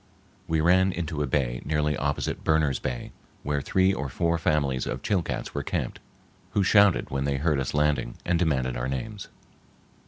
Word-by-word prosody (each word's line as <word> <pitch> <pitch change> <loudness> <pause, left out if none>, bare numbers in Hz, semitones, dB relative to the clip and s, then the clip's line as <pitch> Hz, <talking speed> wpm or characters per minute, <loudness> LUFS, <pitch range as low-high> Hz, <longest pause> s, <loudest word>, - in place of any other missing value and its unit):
We 80 -1 +1
ran 95 +3 +4
into 80 -3 -3
a 75 - 0
bay 60 -3 0
nearly 75 0 0
opposite 70 +1 -2
Berner's 80 -4 +2
Bay, 65 -1 -4 0.3
where 75 0 -1
three 95 +7 +2
or 65 -5 -3
four 85 +5 0
families 70 -5 0
of 65 +2 -4
Chilcats 95 -6 -1
were 70 - -2
camped - - -3 0.5
who 100 - +3
shouted 100 -2 +4
when 70 0 -1
they 70 -1 0
heard 75 0 +1
us 65 +2 -2
landing 75 -4 +1
and 85 -1 +1
demanded 65 -7 +1
our - - -2
names. 100 - -5
75 Hz, 175 wpm, -26 LUFS, 65-85 Hz, 0.5 s, ran